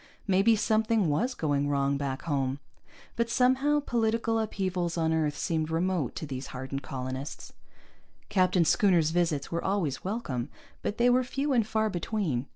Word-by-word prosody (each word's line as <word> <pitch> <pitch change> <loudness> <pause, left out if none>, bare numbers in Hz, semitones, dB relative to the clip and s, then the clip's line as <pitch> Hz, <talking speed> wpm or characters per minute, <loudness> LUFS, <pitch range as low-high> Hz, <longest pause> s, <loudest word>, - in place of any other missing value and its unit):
Maybe 195 +3 +4
something 220 -3 +2
was 245 - 0
going 145 -2 0
wrong 140 0 +1
back 140 -1 -3
home. 135 -4 -1 0.6
But 235 0 0
somehow 265 +4 +3
political 230 -3 0
upheavals 185 -5 -2
on 160 -1 +1
Earth 150 -2 0
seemed 160 -1 -1
remote 165 -4 0
to - - -4
these 135 -2 -5
hardened 135 +2 -5
colonists. 130 +2 -6 0.7
Captain 185 -2 +3
Schooner's 175 -2 +3
visits 165 -5 0
were 170 0 -2
always 185 -9 -1
welcome, 145 - -3 0.3
but 205 - -3
they 245 +1 +4
were 255 +1 +3
few 275 +3 -1
and 230 -4 +2
far 220 0 +1
between. 175 - -2
175 Hz, 155 wpm, -28 LUFS, 145-220 Hz, 0.7 s, Maybe